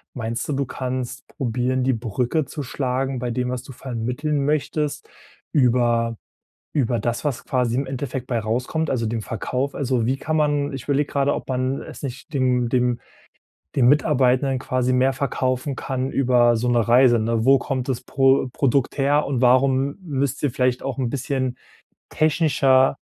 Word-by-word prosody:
Meinst 115 -1 -3
du, 150 - -1
du 140 0 0
kannst 130 +1 -5
probieren, 125 +1 -1
die 130 +1 +2
Brücke 120 +6 -1
zu 145 - -6
schlagen, 130 0 -2
bei 125 0 -3
dem, 125 +1 -1
was 125 -1 -3
du 135 - -11
vermitteln 130 +5 -2
möchtest 150 0 -1 0.4
über 120 -4 +2 0.6
über 125 -5 +1
das, 120 +5 -2
was 140 -5 -2
quasi 125 -2 0
im 135 +2 0
Endeffekt 130 -1 -4
bei 120 -2 0
rauskommt, 125 +9 -1
also 115 -3 0
dem 110 +1 -2
Verkauf. 130 +5 -3
Also, 130 -4 0
wie 130 +3 +1
kann 155 +3 -2
man 145 -1 +1
ich 135 -2 -6
überlege 145 0 0
gerade, 140 0 +1
ob - - -7
man 130 +1 -1
es - - -10
nicht 130 +2 -7
dem 125 -3 +1
dem 125 -1 +1 0.8
den 125 -3 +5
Mitarbeitern 135 -2 +3
quasi 130 -1 0
mehr 130 +1 +3
verkaufen 130 0 -2
kann 130 -1 -3
über 120 -3 +3
so 120 +2 -1
'ne 120 -2 +2
Reise, 120 0 +6
ne? 115 0 0
Wo 135 +2 +6
kommt 130 0 -3
das 125 - -1
Pro 135 +1 +2
Produkt 135 -1 +1
her 145 +2 +2
und 130 -3 -1
warum 130 +3 +3
müsst 140 -4 -2
ihr 145 - +2
vielleicht 125 0 0
auch 135 -2 -3
'n 125 -3 -1
bisschen 130 -1 -2 0.5
technischer 140 -4 +3
130 Hz, 170 wpm, -22 LUFS, 125-140 Hz, 0.8 s, Reise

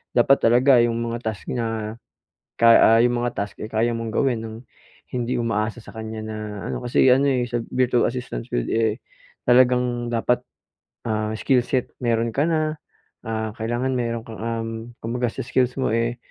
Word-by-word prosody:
dapat 135 +3 +5
talaga 125 +2 +5
yung 120 -1 +2
mga 115 0 -3
task 110 -3 -4
niya 115 -2 -3 0.6
kay 115 0 +7
ah, 115 +1 +6
yung 120 0 +2
mga 120 - 0
task, 100 -1 -4
eh, - - -3
kaya 115 +2 +1
mong 115 -1 -4
gawin 130 -4 +1
nang 110 0 -8 0.5
hindi 125 0 -2
umaasa 115 +1 -1
sa - - -12
kanya 110 0 -6
na 110 0 -6 0.3
ano. - - -4
Kasi 120 +2 +3
ano, 135 +2 +5
eh, 125 -2 +1
sa 120 -1 -2
Virtual 125 -1 +2
Assistance 120 - -5
field, - - -1
eh, 110 0 0 0.5
talagang 125 -1 +3
dapat, 125 +2 +1 0.7
ah, 110 0 -1
skill 125 +2 +2
set 130 -2 -1
mayro'n 115 -1 +1
ka 145 - +2
na, 155 -1 0 0.4
ah, 110 -1 -3
kailangan 120 +4 -1
mayro'n 115 -2 -2
kang, 110 -2 -9
um, 115 0 -3 0.4
kumbaga 120 +1 -1
sa - - -6
skills 125 0 +1
mo, 130 -4 0
eh, 115 +1 0
115 Hz, 175 wpm, -23 LUFS, 110-125 Hz, 0.7 s, kay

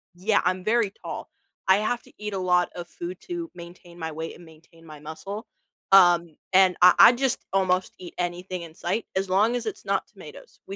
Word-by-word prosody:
Yeah, 205 +4 +1
I'm 185 0 0
very 220 0 +1
tall; - - -6 0.4
I 190 +1 +6
have 220 +3 -1
to - - -20
eat 210 0 -5
a - - -2
lot 180 -1 +2
of 175 -1 -7
food 175 +1 -7
to 345 -2 -6
maintain 175 0 -12
my 160 -1 -4
weight 160 +1 -6
and 175 - -15
maintain 165 +1 -19
my 155 -2 -11
muscle. 195 +9 -8 0.4
Um, 175 -4 +5 0.2
and 185 -1 +5
I 180 0 +9
I - - +10
just 260 0 -1
almost 185 -1 +1
eat 180 -2 -10
anything 180 +1 -4
in 165 -2 -10
sight, 190 +7 -2
as 190 0 -1
long 210 +6 +3
as 245 - -3
it's 415 -2 -6
not - - -1
tomatoes, - - -14
we 195 - -6
185 Hz, 205 wpm, -25 LUFS, 175-205 Hz, 0.4 s, I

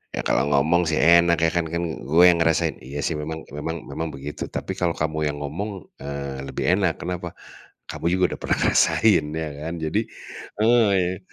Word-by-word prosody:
"Ya, - - -3
kalau 70 - +1
ngomong 80 +5 +3
sih 80 - +1
enak 85 0 +5
ya, 80 - +4
kan 85 -1 0
kan 85 +2 -2 0.2
gue 80 +5 +3
yang 85 -1 +4
ngerasain," 80 -1 +1
iya 70 +2 -7
sih 80 - -1
memang 80 +1 -5
memang 80 +2 -5
memang 80 - -3
begitu, 70 +2 -6
tapi - - -5
kalau 85 -2 0
kamu 80 0 -2
yang 75 0 -3
ngomong, 95 +5 -5 0.2
eee, 70 -1 -5
lebih - - -4
enak, 90 -5 +1
kenapa, 90 -1 -5 0.6
Kamu 85 - -3
juga 95 0 +1
udah - - -7
pernah - - +1
ngerasain 95 -9 +4
ya 80 -1 -3
kan. 80 +2 -4
Jadi 80 -1 -1 0.6
heeh, 100 -6 +3
80 Hz, 185 wpm, -23 LUFS, 75-90 Hz, 0.6 s, enak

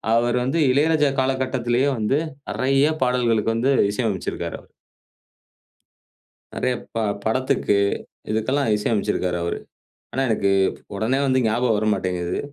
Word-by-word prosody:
அவர் 120 +1 +2
வந்து 140 +6 0
இளையராஜா 150 +1 +3
காலகட்டத்திலேயே 130 0 +1
வந்து 110 +5 +1 0.3
நிறைய 135 +2 +2
பாடல்களுக்கு 120 -3 +1
வந்து 130 +4 +2 0.2
இசை 120 +4 -2
அமைச்சிருக்காரு. 95 -3 -4 2.0
நிறைய 125 - 0 0.2
ப 115 - 0 0.3
படத்துக்கு, 130 -1 +1 0.6
இதுக்கெல்லாம் 130 +4 0
இசை 105 - -2
அமைச்சிருக்கறாரு 90 -3 0
அவரு. 85 - -2 0.5
ஆனா 135 - -1
எனக்கு 100 -3 +1 0.4
உடனே 115 +7 0
வந்து 130 0 +3
ஞாபகம் 115 +1 +1
வர 110 - -1
மாட்டேங்குது. 90 -1 -2
120 Hz, 115 wpm, -22 LUFS, 110-130 Hz, 2.0 s, இளையராஜா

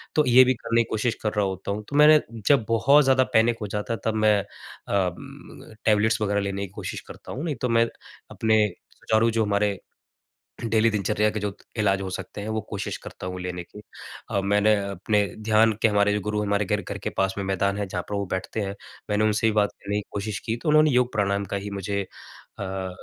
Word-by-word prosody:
तो 150 - +4
ये 125 +1 +8
भी 130 - +3
करने 115 -1 0
की - - -13
कोशिश 115 +2 0
कर 105 - 0
रहा 105 -1 +1
होता 95 +1 -4
हूँ। 105 +1 -4
तो 140 - -5
मैंने 150 +1 +8 0.3
जब 135 -6 +4
बहुत 140 +6 +5
ज़्यादा 130 -1 +4
पैनिक 115 +1 +4
हो 105 - -3
जाता 105 +3 -3
है 115 - -4
तब 110 - +1
मैं 110 -1 +4
उम, 95 0 -6
टैबलेट्स 110 +1 +3
वगैरह 100 -1 +1
लेने 100 0 -3
की - - -21
कोशिश - - -5
करता - - -11
हूँ। 135 - -5
नहीं 155 -4 -2
तो 125 - 0
मैं 115 0 +4 0.5
अपने 110 -1 +2 0.3
सुचारू 110 +1 +1
जो 115 0 +1
हमारे। 100 -1 +1 0.9
डेली 115 0 +3
दिनचर्या 105 +1 +1
के 110 - -3
जो 105 0 -2 0.3
इलाज 100 -2 +2
हो 95 - -4
सकते 95 +2 -6
हैं 105 - -5
वो 110 0 -1
कोशिश - - -4
करता - - -9
हूँ 90 0 -5
लेने 90 -1 -4
की। 105 +4 -13 0.5
अ, 100 - +1
मैंने 105 +2 +3
अपने 100 +2 0 0.2
ध्यान 110 +1 +4
के - - +5
हमारे 105 -1 +2
जो 105 - 0
गुरु 105 +1 -2
हैं 105 - -2
हमारे 100 0 +1
घर 105 +2 0
घर - - -6
के - - -1
पास 95 0 +1
में 100 - -2
मैदान 100 +1 0
है 105 - -1
जहाँ 90 -1 -4
पर 105 - -2
वो 100 0 -1
बैठते 95 +4 -3
हैं, 100 -1 -4 0.3
मैंने 105 +1 +1
उनसे 110 +1 +2
भी - - +3
बात 105 -1 +3
करने 100 +1 -4
की - - -7
कोशिश 100 0 -3
की 115 - -1
तो - - 0
उन्होंने 155 0 +5
योग 125 -1 +2
प्राणायाम 100 -1 0
का - - +1
ही 100 +1 -5
मुझे 100 0 -2 0.6
अ, 95 -1 -4
105 Hz, 230 wpm, -25 LUFS, 100-110 Hz, 0.9 s, ये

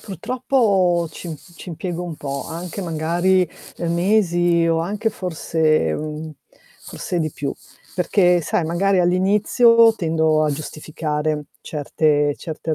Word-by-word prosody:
purtroppo 200 - +1
ci 165 -3 -7 0.2
ci 180 - -10
impiego 175 +1 -4
un 170 -2 -5
po' 140 -2 -5
anche 170 +4 -6
magari 175 +2 +1 0.4
mesi 175 -2 +2
o 165 0 +2
anche 205 +6 -1
forse, 160 - 0
mhmm, 155 - -5 0.5
forse 180 - -4
di 155 -2 -2
più 140 -1 -3 0.4
perché 180 0 +3
sai 160 - 0
magari 185 +4 +2
all'inizio 210 +6 +4
tendo 160 -3 +1
a 150 - +1
giustificare 150 0 -3
certe 145 -1 0
certe 160 0 -4
170 Hz, 120 wpm, -21 LUFS, 155-185 Hz, 0.5 s, all'inizio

